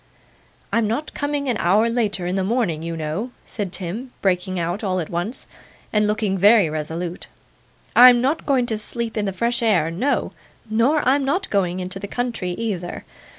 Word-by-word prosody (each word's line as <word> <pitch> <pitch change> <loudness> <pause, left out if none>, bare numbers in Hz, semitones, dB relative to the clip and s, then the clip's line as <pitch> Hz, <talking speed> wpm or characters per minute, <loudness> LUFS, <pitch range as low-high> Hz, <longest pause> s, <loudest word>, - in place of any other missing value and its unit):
'I'm 230 -2 +2
not 260 +8 -3
coming 285 -1 -2
an 245 -4 +1
hour 205 +6 +3
later 210 -6 -1
in 180 +1 -1
the 190 - 0
morning, 195 -7 0
you 165 0 -4
know,' 160 +10 -3 0.2
said 205 -5 -4
Tim, 200 +8 -5
breaking 185 -1 0
out 175 +5 -2
all 185 -2 0
at 165 - -5
once, 175 +8 -3 0.5
and 210 -1 +3
looking 210 -2 0
very 205 -4 +6
resolute. 165 +3 -4 0.7
'I'm 245 0 +9
not 280 +7 0
going 265 -4 +3
to 220 -3 -1
sleep 230 +1 -3
in 210 -2 0
the 195 - -1
fresh 235 +6 -1
air; 180 -8 +2
no, 250 +12 0 0.4
nor 240 +7 +2
I'm 275 +2 +3
not 360 +9 -1
going 185 -3 +1
into 185 +1 -4
the 200 - -6
country 230 -7 -3
either. 185 -4 -4
210 Hz, 180 wpm, -22 LUFS, 180-240 Hz, 0.7 s, I'm